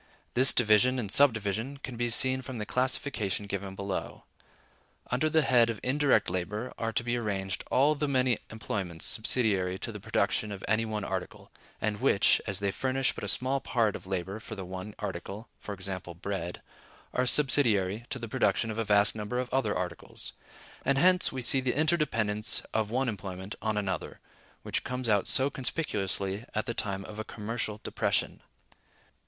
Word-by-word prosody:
This 130 +2 +6
division 120 +3 +4
and 105 -6 -2
subdivision 115 -1 +3
can 130 -3 -7
be 120 +1 -1
seen 130 +3 +3
from 130 -1 -7
the 105 - -3
classification 125 -5 -1
given 100 -1 -4
below. 100 -1 -4 0.9
Under 130 +6 +2
the 160 0 +3
head 120 -3 +4
of 115 -3 -3
indirect 140 +2 +3
labor 105 +7 -3
are 115 0 -1
to 115 - -1
be 120 0 0
arranged 95 -4 -2
all 140 +4 +4
the 150 0 -1
many 130 -3 +2
employments 95 -6 -4
subsidiary 100 -5 +2
to - - -5
the - - -7
production 105 - 0
of 100 -2 -7
any 110 +2 +2
one 110 -2 -3
article, 95 -2 -5 0.3
and 105 -1 -2
which, 115 -6 +4
as 100 -2 +1
they 100 0 0
furnish 130 +4 0
but - - -8
a - - -2
small 130 +7 +2
part 115 -5 +1
of - - -9
labor 95 +2 -3
for 110 0 -8
the 95 -2 -6
one 95 +3 -7
article 100 +2 -6 0.2
(e.g., 95 -1 -4 0.2
bread), 95 -3 -4 0.5
are 125 0 +1
subsidiary 115 -7 +3
to - - -3
the 115 -2 -5
production 105 +1 +1
of 110 - -4
a - - +2
vast 105 0 +4
number 110 +3 -4
of 125 0 -3
other 130 -6 +1
articles; 90 -2 -6 0.5
and 135 - +2
hence 180 +4 +4
we 130 -1 -4
see 130 +2 +5
the 130 +1 -1
interdependence 115 -10 +1
of 110 -1 +1
one 130 +3 0
employment 95 -2 -5
on 110 -2 -1
another, 95 -5 -3 0.4
which - - -2
comes 125 -1 -2
out 105 -3 +3
so 135 +1 +4
conspicuously 105 - -1
at 110 - 0
the 120 - -2
time 100 -4 -2
of 105 - -8
a - - -2
commercial 110 0 -4
depression. - - -1
110 Hz, 175 wpm, -29 LUFS, 100-130 Hz, 0.9 s, This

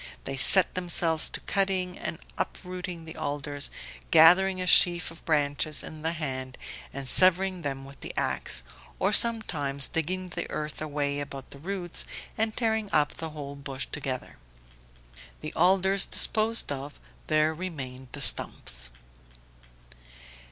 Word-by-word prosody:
They - - -4
set 180 +8 +6
themselves 170 -3 +3
to - - -4
cutting 190 -2 0
and - - -5 0.2
uprooting 180 -2 -5
the 160 - -9
alders, 145 0 -2 0.4
gathering 185 +4 +6
a 185 - -2
sheaf 175 -1 +5
of 165 - -14
branches 150 -1 +1
in 155 -1 -8
the 165 +2 -1
hand 130 -5 -4 0.3
and 140 -1 -6
severing 185 +4 +4
them 135 -3 -4
with 140 +1 -13
the - - -6
ax, - - 0 0.3
or 195 +3 +1
sometimes 160 - +2
digging 180 +3 -2
the 175 -1 -5
earth 150 -1 -4
away 145 -2 -1
about 140 -2 -7
the 140 - -10
roots 180 +1 -3 0.3
and 220 0 -1
tearing 220 -3 0
up 150 -1 +2
the 160 - -4
whole 145 -2 -7
bush 140 -1 -5
together. 130 -3 -4 1.0
The - - -5
alders 190 +2 +3
disposed 220 -4 +2
of, 140 +1 -6 0.3
there 155 +1 +3
remained 135 -7 -6
the - - -4
stumps. - - 0
160 Hz, 135 wpm, -28 LUFS, 140-185 Hz, 1.0 s, set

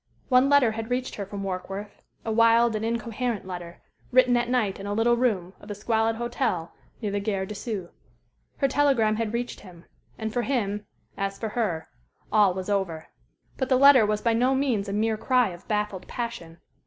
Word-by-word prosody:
One 255 +1 +5
letter 285 -5 +5
had 225 +1 -5
reached 250 +1 -2
her 200 -2 -5
from 200 0 -6
Warkworth, 195 +2 -5 0.2
a 225 - -1
wild 230 0 +4
and 215 - -2
incoherent 230 -1 -2
letter, 175 -2 -8 0.3
written 250 0 +5
at 240 0 +1
night 220 -7 0
in 200 - -6
a 205 - -2
little 235 +2 +3
room 205 -7 0
of 205 - -14
a 205 - -4
squalid 225 +2 +1
hotel 235 -7 -2 0.3
near 205 - -1
the 205 - -1
Gare 200 -2 -1
de 210 - -6
Sceaux. 200 -4 -5 0.7
Her 275 - +2
telegram 260 -6 +2
had 225 -2 -1
reached 240 +1 -3
him, 175 -3 -14 0.3
and 220 -1 -4
for 245 - +1
him, 210 -5 -2 0.3
as 195 0 -2
for 220 - -3
her, 205 -8 -2 0.4
all 200 -4 +4
was 185 -1 -4
over. 190 -6 -2 0.5
But 260 - -2
the 260 - +4
letter 275 -3 +8
was 210 0 0
by 230 - +3
no 250 +4 +2
means 245 -7 0
a - - -3
mere 220 +1 +1
cry 250 0 +2
of 175 0 -11
baffled 210 -3 -2
passion. 230 -9 -5
220 Hz, 195 wpm, -26 LUFS, 200-240 Hz, 0.7 s, letter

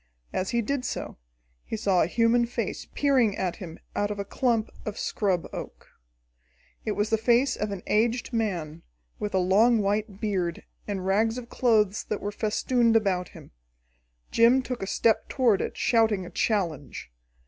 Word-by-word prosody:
As 185 - -1
he 235 -1 0
did 275 +3 -2
so, - - -5 0.4
he - - -4
saw 195 -5 +2
a - - +2
human 230 +4 +2
face 240 - -4
peering 260 -8 +2
at 180 -2 -2
him 170 -5 -8 0.2
out 205 - 0
of 210 - -4
a 200 - -3
clump 230 0 0
of 210 - -5
scrub 190 -5 -1
oak. - - -8 0.9
It 215 - -1
was 210 +2 -1
the 220 - +3
face 240 +4 +3
of 210 - -3
an 200 -3 -6
aged 230 +3 +1
man, 175 -8 -2 0.4
with 210 -2 -3
a - - +4
long 205 +6 +4
white 205 0 -1
beard 185 -6 -2 0.2
and 195 -3 -3
rags 220 +4 +2
of 245 -1 -7
clothes 215 -5 +2
that 210 - -3
were 205 - -4
festooned 230 +2 +1
about 190 -5 +1
him. - - -14 0.8
Jim 240 +3 +5
took 250 -1 -5
a 195 - -3
step 225 +2 +1
toward 240 -7 +2
it, - - -4
shouting 220 -5 +2
a - - -10
challenge. 165 - -2
215 Hz, 170 wpm, -26 LUFS, 195-235 Hz, 0.9 s, Jim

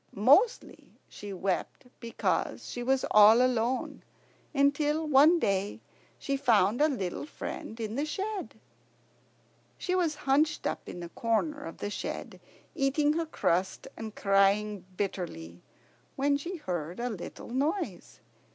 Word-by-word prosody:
Mostly 300 - +2
she 205 - -9
wept 190 +5 -3
because 235 -1 -2
she 245 - -5
was 260 +2 +1
all 215 +2 +8
alone, 250 0 0 0.5
until 295 +2 +2
one 300 +4 +6
day 200 - -1 0.4
she 275 - -2
found 225 -2 +3
a 305 - +6
little 200 - -3
friend 225 -6 -7
in 220 -1 -3
the 280 +5 -1
shed. 395 +5 -4 1.2
She 365 - -2
was 345 -4 +1
hunched 295 +3 +2
up - - -3
in 175 - -7
a 170 - -7
corner 235 - -1
of 165 - -8
the 205 - -4
shed, - - -5 0.3
eating 290 +2 +2
her 330 0 -2
crust 185 - -1
and 220 -1 -7
crying 200 0 +2
bitterly, 90 - -4 0.5
when 280 +1 +2
she 340 +7 -4
heard 175 - -4
a 245 - -1
little 200 +2 -8
noise. 295 +10 -3
245 Hz, 135 wpm, -29 LUFS, 200-295 Hz, 1.2 s, all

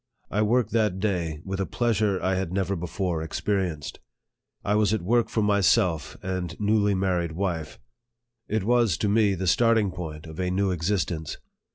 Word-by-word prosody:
I 105 - +1
worked 115 +1 +2
that 105 -5 +1
day 85 -7 -1
with 95 0 -4
a 95 - -1
pleasure 110 -5 +1
I 95 - +1
had 95 -2 -2
never 95 0 0
before 90 -1 -2
experienced. 80 -2 -2 0.7
I 100 - +1
was 105 0 +3
at 105 - -4
work 115 +5 +2
for 110 - 0
myself 95 -6 +2
and 90 -2 -4
newly 105 -1 +2
married 90 -3 0
wife. 85 -4 -3 0.7
It 110 -1 -1
was 115 -5 +3
to 105 - 0
me 105 -1 +3
the 95 +1 -3
starting 110 +1 +3
point 80 -4 -7
of 80 +1 -10
a 90 -1 0
new 95 +1 +1
existence. 85 -2 -2
95 Hz, 170 wpm, -26 LUFS, 90-105 Hz, 0.7 s, was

